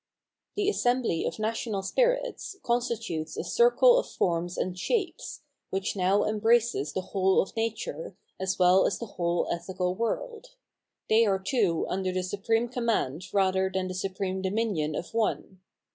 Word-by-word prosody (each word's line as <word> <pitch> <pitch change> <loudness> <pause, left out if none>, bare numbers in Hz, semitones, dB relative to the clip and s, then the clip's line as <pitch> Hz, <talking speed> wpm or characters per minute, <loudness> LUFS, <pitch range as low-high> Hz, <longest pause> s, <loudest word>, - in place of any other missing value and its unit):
The 410 -2 0
assembly 245 - +1
of - - -3
national 215 -2 -2
spirits - - 0
constitutes 230 -10 -2
a - - -2
circle - - +5
of - - -4
forms 175 0 -1
and 180 -1 -2
shapes, 360 - -2 0.3
which 195 +2 -2
now 190 +1 +2
embraces 225 -5 +2
the 190 - -2
whole 190 0 +2
of 190 - -1
nature, 215 -7 -3 0.2
as 190 0 -1
well 180 +1 +5
as 185 - -1
the 235 - -5
whole 175 -4 -1
ethical 180 +1 -2
world. 460 - -4 0.5
They 225 +1 +4
are 195 -1 +2
too 190 -4 0
under 185 0 -1
the 185 0 -1
supreme 225 +5 0
command 225 - -1
rather 190 -1 +2
than 190 -1 -1
the - - -4
supreme 190 0 -3
dominion 190 -6 -1
of 175 - -5
one. 215 -4 -1
195 Hz, 150 wpm, -28 LUFS, 185-235 Hz, 0.5 s, circle